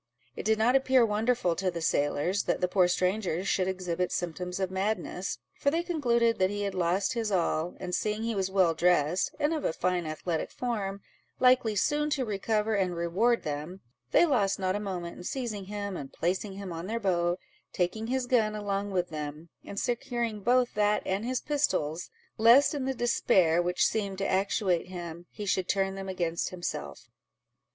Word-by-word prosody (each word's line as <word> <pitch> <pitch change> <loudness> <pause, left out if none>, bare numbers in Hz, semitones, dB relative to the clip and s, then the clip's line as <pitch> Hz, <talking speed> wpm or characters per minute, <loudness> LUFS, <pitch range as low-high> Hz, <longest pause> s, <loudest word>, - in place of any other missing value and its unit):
It - - -6
did 220 0 +3
not 235 +4 +3
appear 260 -2 +4
wonderful 215 -4 +1
to 190 -1 0
the 170 -1 -4
sailors, 160 +4 0
that - - 0
the 180 - +1
poor 180 0 +3
stranger 185 0 0
should 185 -1 +1
exhibit 180 -1 -2
symptoms 180 +2 -3
of 190 -1 -1
madness, 190 -1 -2 0.2
for 280 - +3
they 330 +4 0
concluded 235 - +1
that 185 0 +3
he 205 0 -3
had 200 -1 -2
lost 185 +5 +1
his 225 -3 -2
all; 170 -2 0
and 180 -1 -5
seeing 215 +3 -1
he 230 0 -1
was 190 -2 -1
well 190 -3 +3
dressed, 175 0 +2
and 295 +3 +2
of 310 - -2
a - - +1
fine 180 0 -1
athletic 155 +1 -3
form, 200 -5 -3 0.4
likely 250 -4 +4
soon 295 +8 +1
to 280 -4 0
recover 215 +1 0
and 185 -4 0
reward 185 +8 +1
them, 150 +5 -5 0.3
they 345 - +5
lost 210 - +2
not 185 0 0
a - - -1
moment 180 -4 -5
in - - -9
seizing 220 -3 -4
him, 200 -1 -4
and 135 -5 -7
placing 185 +4 -2
him 195 -1 -7
in 165 +2 -5
their 230 +2 -2
boat, 175 -4 +1 0.3
taking 205 +5 -1
his 260 +1 0
gun 225 -4 +2
along 205 -1 -2
with 180 -2 -1
them, 150 +1 -6
and 200 - -5
securing 240 -2 -2
both 245 +3 +2
that 210 0 +2
and 195 +4 -1
his 255 0 -1
pistols, 180 - -1 0.3
lest 235 +7 +6
in 280 -3 -2
the 265 0 -1
despair 185 -8 +3
which 180 +1 +1
seemed 200 -3 -1
to 195 - -1
actuate 190 -2 +1
him, 175 -1 -7
he 210 - -7
should 185 -1 0
turn 195 -1 +1
them 195 0 -6
against 170 -3 -1
himself. 180 -1 -5
195 Hz, 190 wpm, -29 LUFS, 180-225 Hz, 0.4 s, lest